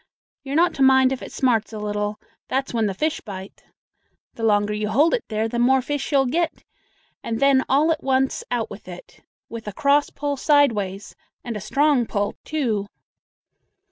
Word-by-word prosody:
You're 275 0 -4
not 345 +2 +3
to - - -5
mind 265 -1 +5
if 260 -4 -3
it 195 - -8
smarts 230 -5 +1
a 220 - -6
little; 210 0 -3 0.3
that's 265 0 -2
when 225 -2 +1
the 195 - -3
fish 310 +8 -1
bite. 195 -2 -9 0.7
The - - -10
longer 210 -1 +2
you 210 0 -2
hold 295 +9 +3
it - - 0
there, 220 0 -1
the 235 +1 -3
more 265 +2 +4
fish 285 +2 -3
you'll 275 -2 +4
get; 325 +6 -1 0.6
and 225 -1 -3
then 275 -1 +4
all 295 +5 +3
at 315 - -1
once 265 0 +1
out 235 -2 -2
with 205 -1 -10
it, 180 -1 -12 0.3
with 225 -2 -8
a 210 - -4
cross 285 +2 +2
pull 285 0 -3
side 285 -1 +4
ways 200 -1 -5 0.3
and 235 -2 -5
a 210 - -5
strong 275 +2 +2
pull, 205 -1 -1
too." 230 -10 -1
245 Hz, 190 wpm, -22 LUFS, 210-280 Hz, 0.7 s, mind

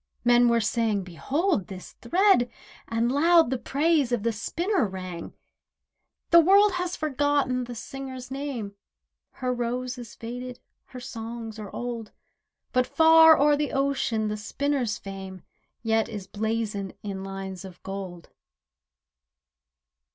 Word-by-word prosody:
Men 240 0 +5
were 235 0 +3
saying: 220 -2 0
"Behold 265 - -1
this 190 -3 -9
thread," 370 -9 +3 0.4
And 230 +1 0
loud 325 0 +4
the 260 - -1
praise 290 -1 +1
of 240 -4 0
the 230 - +1
spinner 340 - -1
rang. 185 -3 -7 1.0
The 340 - +9
world 395 +5 +6
has 360 0 -2
forgotten 285 -4 0
the 240 0 -7
singer's 260 +1 -7
name— 265 -7 -4 0.6
Her 255 -1 -2
rose 250 +1 -3
is 230 -5 -10
faded, 245 +2 -7 0.3
her 255 - -10
songs 225 -2 -7
are 210 -2 -7
old; 235 -1 -5 0.6
But 255 0 +2
far 320 0 +7
o'er 295 +1 +5
the 295 0 -2
ocean 270 -5 0
the 210 0 -2
spinner's 245 +1 -1
fame 190 -1 -8 0.4
Yet 225 0 +1
is 205 -4 -6
blazoned 210 -1 -3
in 195 -2 -5
lines 195 -1 -6
of 185 -2 -11
gold. 190 -3 -7
240 Hz, 130 wpm, -26 LUFS, 210-280 Hz, 1.0 s, The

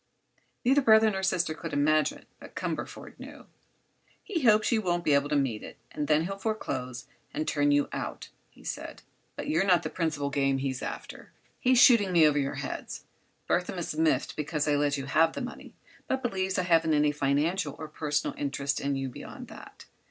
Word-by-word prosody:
Neither 270 +3 +5
brother 220 -3 +6
nor 190 -1 -3
sister 180 -4 +1
could 165 +1 -7
imagine; 155 +2 +1
but - - -13
Cumberford - - -5
knew. - - -11 0.8
"He 355 -6 -3
hopes 215 -3 +4
you 225 -2 +2
won't 175 -3 0
be 155 -3 +3
able 140 +1 +2
to - - +1
meet 130 -7 0
it, - - -10
and 150 -1 -3
then 155 +1 +3
he'll 195 +2 -5
foreclose 130 - -3 0.3
and 155 - -2
turn 145 -1 +2
you 145 0 +3
out," - - -5 0.2
he - - -20
said. - - -6 0.3
"But - - -6
you're 160 +5 +2
not 180 -3 +3
the - - -4
principal 155 -5 -2
game 135 -1 +1
he's 135 -1 -3
after; - - -7 0.3
he's 255 0 +3
shooting 235 -6 +6
me 165 -3 +7
over 145 -1 +2
your 140 0 -2
heads. 140 0 -6 0.4
Burthon 180 +1 0
is 170 -3 -3
miffed 160 0 +1
because 150 0 -2
I 150 - +3
let 145 0 +1
you 135 - -4
have 160 +4 +3
the - - -5
money, 250 - -8 0.3
but 265 0 -1
believes 190 -5 -1
I 185 - +1
haven't 165 -3 +3
any 150 0 +3
financial 150 +3 0
or 155 - -7
personal 150 -1 -2
interest 140 0 -2
in 140 0 -1
you 135 0 -2
beyond 125 - -9
that. - - -12
155 Hz, 195 wpm, -28 LUFS, 145-190 Hz, 0.8 s, me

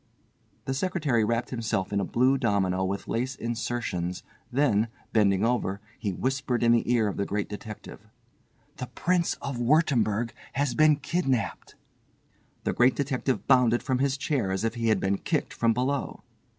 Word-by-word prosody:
The 135 - -1
secretary 145 -7 0
wrapped 115 +2 -1
himself 115 -6 -2
in 100 - +2
a - - 0
blue 125 +7 +2
domino 100 -7 +1
with 95 +1 -3
lace 130 +3 -2
insertions, 115 -7 -3 0.3
then, 120 -5 +2 0.3
bending 100 -2 +3
over, 115 -5 0 0.2
he 100 - -2
whispered 130 +3 -1
in 115 - +5
the 120 0 +2
ear 115 -3 +3
of 100 - -3
the 100 - 0
Great 105 0 -2
Detective: 105 0 -9 0.7
"The 125 - -5
Prince 175 +3 0
of 135 -3 -3
Wurttemberg 120 -5 +2 0.2
has 140 -2 0
been 155 -1 +5
kidnapped." 140 -5 -2 0.9
The - - 0
Great 125 +1 +4
Detective 130 -4 -1
bounded 125 -3 +4
from 130 -1 0
his 135 0 +1
chair 130 -9 -1
as 95 +2 -1
if 115 0 0
he 115 -1 -2
had 110 -3 +3
been 95 +1 0
kicked - - -1
from 115 -1 +2
below. 130 +4 -2
120 Hz, 165 wpm, -27 LUFS, 105-135 Hz, 0.9 s, in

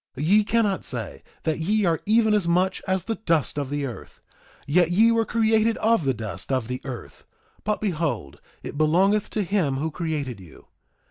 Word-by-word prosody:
Ye 190 +10 +4
cannot 210 -3 +1
say 115 -6 -4 0.2
that 160 -1 -1
ye 205 +5 +1
are 165 -2 +1
even 220 0 +4
as 205 -5 +1
much 180 +2 +1
as 190 -2 0
the 225 - -2
dust 160 - +1
of 140 -2 -3
the 145 0 -2
earth; 120 -4 -9 0.5
yet 170 +3 +3
ye 220 +6 +5
were 230 -1 +2
created 225 0 +2
of 225 -7 +2
the 135 - +2
dust 110 +3 -6
of 130 -4 0
the 125 +1 -4
earth; 130 -4 -8 0.4
but 210 0 -1
behold, 155 - -2 0.2
it 145 - -6
belongeth 190 +7 +3
to 210 - -1
him 180 -8 0
who 155 +4 -2
created 150 - -3
you. 90 -5 -15
170 Hz, 185 wpm, -24 LUFS, 140-210 Hz, 0.5 s, ye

